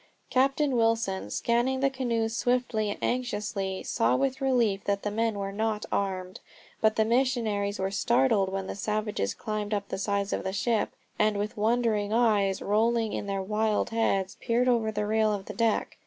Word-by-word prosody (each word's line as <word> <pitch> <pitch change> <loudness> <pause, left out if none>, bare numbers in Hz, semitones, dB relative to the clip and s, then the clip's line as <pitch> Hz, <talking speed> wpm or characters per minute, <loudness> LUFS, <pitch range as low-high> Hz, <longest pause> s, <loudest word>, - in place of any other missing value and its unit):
Captain 275 +1 +2
Wilson, 225 - +1
scanning 240 - +1
the 275 - +3
canoes 230 -4 -1
swiftly 245 -4 0
and 205 - -3
anxiously, 205 -6 -2
saw 115 +2 +1
with 265 - 0
relief 235 -7 +2
that 200 -1 0
the 210 - -1
men 225 0 0
were 195 0 -3
not 215 +1 -1
armed. 185 -2 -2 0.4
But 220 0 +3
the 220 - +3
missionaries 225 -5 +1
were 190 0 -2
startled 225 -1 +2
when 195 0 -3
the - - -4
savages 210 - -2
climbed 215 0 -3
up 200 -1 -4
the - - -3
sides 200 0 -1
of - - -2
the 190 - -3
ship, 215 +2 0 0.3
and 215 -1 +2
with 210 +3 -3
wondering 215 -1 +1
eyes 210 -4 +2
rolling 225 +1 +1
in - - -3
their 195 -1 -2
wild 215 +2 0
heads 195 -4 0
peered 245 +1 +1
over 230 -3 +2
the 210 -1 -2
rail 215 0 +2
of 200 -2 -3
the - - -7
deck. 230 -2 0
215 Hz, 180 wpm, -28 LUFS, 200-235 Hz, 0.4 s, the